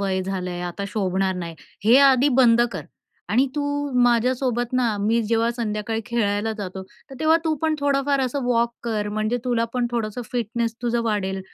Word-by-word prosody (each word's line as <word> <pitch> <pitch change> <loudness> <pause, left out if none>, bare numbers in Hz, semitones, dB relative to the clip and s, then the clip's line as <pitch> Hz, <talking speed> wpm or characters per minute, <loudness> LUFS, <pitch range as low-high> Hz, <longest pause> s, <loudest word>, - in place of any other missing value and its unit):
वय 190 -1 0
झालंय. 180 -2 -4
आता 180 +3 -4
शोभणार 190 -2 -1
नाही. 170 -2 -5 0.3
हे 240 +5 +7
आधी 275 0 +5
बंद 235 -1 +5
कर. - - -6 0.4
आणि 260 +4 +3
तू 295 - -1 0.4
माझ्यासोबत 245 0 +1
ना 240 -4 +1
मी 225 +3 +2
जेव्हा 230 +1 +1
संध्याकाळी 220 -1 -2
खेळायला 220 -2 0
जातो, 190 -1 -5 0.3
तर - - -8
तेव्हा 315 +1 +5
तू 315 -1 +1
पण 315 -1 +2
थोडंफार 280 0 +1
असं 265 +1 -1
वॉक 235 -1 +1
कर 215 -3 -2
म्हणजे 215 +3 -1
तुला 240 -2 +1
पण 245 -1 +1
थोडंसं 230 0 -3
फिटनेस 230 -1 -2
तुझं 235 0 0
वाढेल 195 -4 -1
230 Hz, 170 wpm, -23 LUFS, 205-245 Hz, 0.4 s, हे